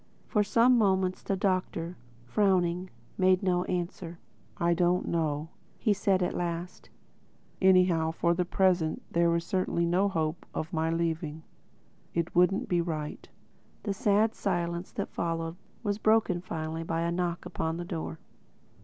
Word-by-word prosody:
For 210 -3 +2
some 235 +4 +4
moments 190 -3 +2
the 195 - -1
Doctor, 185 -3 -1 0.3
frowning, 180 - +1 0.3
made 185 0 +4
no 180 -1 +1
answer. 175 -1 -4 0.4
"I 170 0 +2
don't 175 +1 +2
know," 155 -2 -1 0.3
he 215 - +2
said 195 -2 +1
at 175 - -1
last—"Anyhow 175 0 -1
for 170 +1 +1
the 180 +1 +1
present 180 -3 +1
there 170 0 +3
is 170 - 0
certainly 185 -2 0
no 185 +4 +2
hope 160 -2 -2
of 160 +4 -4
my 160 0 +1
leaving. 165 -2 -2 0.7
It 170 0 -1
wouldn't 180 +3 +3
be 175 -1 +2
right." 155 -3 -4 0.5
The 200 - -1
sad 210 +2 +2
silence 175 -2 -2
that - - -4
followed 165 -1 -2 0.3
was 205 -1 -1
broken 215 -5 +3
finally 160 -2 -4
by 165 0 -2
a 170 0 0
knock 175 -1 -2
upon 160 0 -2
the 175 - -5
door. 165 -2 -4
175 Hz, 145 wpm, -29 LUFS, 165-190 Hz, 0.7 s, some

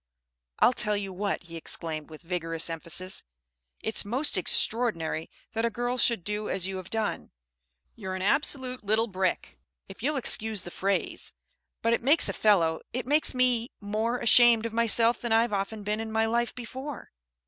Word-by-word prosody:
"I'll 250 - +4
tell 210 -3 0
you 195 -2 -5
what," 200 +1 -2
he 170 -1 -11
exclaimed 160 -1 -3
with 155 +1 -12
vigorous 165 -1 -2
emphasis, 175 +3 -2 0.6
"it's 220 - +2
most 255 +9 +1
extraordinary 185 -5 +1 0.2
that 225 - -1
a 235 - +2
girl 245 +2 -2
should 235 -8 +2
do 210 +2 -3
as 185 -2 -1
you 190 0 -3
have 185 -1 -8
done. 220 -1 -3 0.7
You're 190 -4 -5
an 185 - -4
absolute 260 +1 0
little 215 +2 +2
brick, 190 -4 -3 0.3
if 195 +3 -12
you'll 290 +4 0
excuse 220 -5 +1
the 175 - -8
phrase. 195 +2 -2 0.5
But 230 0 +3
it - - 0
makes 285 +7 +5
a - - -1
fellow 170 -7 +2
it 250 +1 -4
makes 295 +1 +3
me 250 -1 +2
more 220 +3 -2
ashamed 240 -1 +5
of 230 - -4
myself 230 +1 +4
than 235 - -3
I've 225 0 +3
often 205 +2 -3
been 210 +1 -1
in 225 0 -5
my 220 0 +1
life 235 +1 -1
before." 260 +3 -8
220 Hz, 175 wpm, -27 LUFS, 190-240 Hz, 0.7 s, makes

